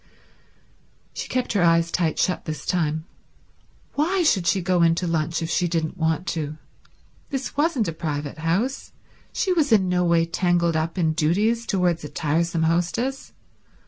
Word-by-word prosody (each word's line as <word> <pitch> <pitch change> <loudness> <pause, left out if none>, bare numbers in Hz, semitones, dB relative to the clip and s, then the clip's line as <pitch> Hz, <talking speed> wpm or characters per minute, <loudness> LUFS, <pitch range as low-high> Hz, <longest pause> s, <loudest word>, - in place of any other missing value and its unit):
She - - -5
kept 255 -2 -1
her 200 - +2
eyes 170 0 +3
tight 165 -3 0
shut 180 - 0
this 155 -2 -5
time. 160 -3 -1 0.9
Why 350 +5 +1
should 195 - +2
she 175 +3 +3
go 180 -1 +1
in 165 0 +4
to 180 - -2
lunch 165 0 -1
if 165 - -3
she 180 - +1
didn't 165 -1 -2
want 160 0 0
to? 155 -2 -3 0.7
This 270 -2 -4
wasn't 290 -6 +1
a 165 - -2
private 150 -2 -4
house; 190 +12 -1 0.4
she 375 - 0
was 305 -6 +1
in 200 -4 +4
no 180 0 +2
way 170 -1 +3
tangled 170 -1 +1
up 160 +3 -1
in 160 -3 +2
duties 210 +9 +1
towards 180 -5 +1
a 150 - -6
tiresome 165 +2 0
hostess. 175 +11 -1
170 Hz, 165 wpm, -23 LUFS, 160-200 Hz, 0.9 s, in